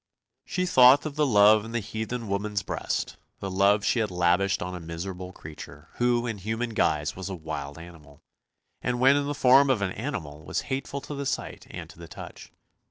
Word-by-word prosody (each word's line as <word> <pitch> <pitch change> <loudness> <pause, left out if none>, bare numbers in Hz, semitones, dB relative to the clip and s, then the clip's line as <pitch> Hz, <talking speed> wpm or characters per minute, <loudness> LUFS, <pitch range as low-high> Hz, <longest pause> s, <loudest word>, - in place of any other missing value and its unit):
She 180 0 -1
thought 130 -4 +6
of 150 -2 -4
the 150 -1 +2
love 105 -2 +6
in 115 +1 -8
the 120 - +1
heathen 110 +2 -5
woman's 100 +1 -2
breast, - - -3 0.2
the 95 - -4
love 100 +2 +3
she 120 - +2
had 110 -2 0
lavished 90 +2 +1
on 90 +1 -5
a 90 - -5
miserable 90 +2 -6
creature, 75 -2 -11
who 120 -1 +2
in 115 -4 -4
human 110 +4 -3
guise 75 -8 0
was 95 +1 -6
a 95 - -4
wild 75 -3 -6
animal, 80 -4 -14 0.6
and 125 -1 -1
when 135 +2 +6
in 145 0 0
the 145 - -2
form 135 +2 +6
of 120 -6 +2
an 95 - -1
animal 95 - -5
was - - -2
hateful 140 +1 -3
to 145 - -7
the 140 -1 -3
sight - - -4
and - - -7
to - - -18
the 85 - -9
touch. - - -10
105 Hz, 205 wpm, -27 LUFS, 90-125 Hz, 0.6 s, thought